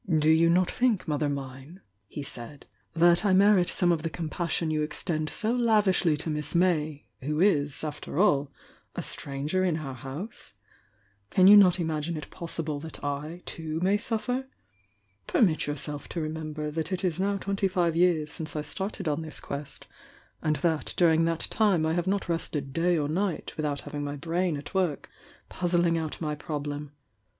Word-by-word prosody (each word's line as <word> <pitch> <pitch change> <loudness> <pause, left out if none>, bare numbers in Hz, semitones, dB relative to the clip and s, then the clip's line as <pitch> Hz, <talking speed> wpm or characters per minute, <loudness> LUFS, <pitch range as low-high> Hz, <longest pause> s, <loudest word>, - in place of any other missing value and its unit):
"Do 155 +1 +4
you 165 +1 +5
not 180 +1 +3
think, 240 -8 +1
Mother 150 -1 0
mine," 135 +4 -6 0.3
he 145 - -6
said, 135 +1 -9 0.3
"that 175 +2 +5
I 200 -3 +3
merit 195 -1 +5
some 175 -2 +2
of 165 -2 +1
the 165 - -2
compassion 160 +1 -2
you 155 -1 0
extend 155 0 -2
so 220 - -1
lav 230 -4 +3
ishly 180 -5 +3
to 160 +2 -2
Miss 150 +1 -4
May, 155 -5 +1 0.2
who 150 +3 -2
is, 150 -8 +2
after 150 -1 -5
all, 145 -8 +3 0.4
a - - -3
stranger 145 +7 -2
in 175 -4 +1
our 140 -4 -5
house? 135 - -7 0.7
Can 185 - +4
you 200 +2 +10
not 190 -3 +7
imagine 160 0 -2
it 150 - -8
possible 160 -4 -4
Uiat 160 0 -8
I, 150 +5 -4
too, 160 -1 -4
may 190 +3 +3
suffer? 245 +4 -2 0.8
Permit 170 -11 +2
yourself 145 0 -5
to 170 - -3
remember 155 -1 -4
that 160 +2 -3
it 185 +1 -2
is 180 -2 0
now 200 +1 +1
twenty 195 0 0
five 175 -3 +1
years 165 -3 +2
since 155 0 -7
I 150 - -2
started 195 +3 -4
on 150 +1 0
this 155 -1 -6
quest, 140 0 -6 0.6
and 155 0 +1
that 160 -1 -1
during 165 -2 +4
that 165 -1 0
time 200 -7 +3
I 160 - +1
have 175 +1 -1
not 195 0 0
rested 150 -5 -3
day 175 +2 +2
or 145 -2 0
night 175 +1 -2
without 150 -2 -2
having 145 -1 -5
my 145 0 -3
brain 170 +2 -1
at 145 +5 -9
work, 180 -6 -1 0.4
puz 175 -1 +1
zling 170 -1 +3
out 160 -2 -4
my 150 -2 -2
problem. 150 -1 -5
160 Hz, 180 wpm, -28 LUFS, 150-180 Hz, 0.8 s, you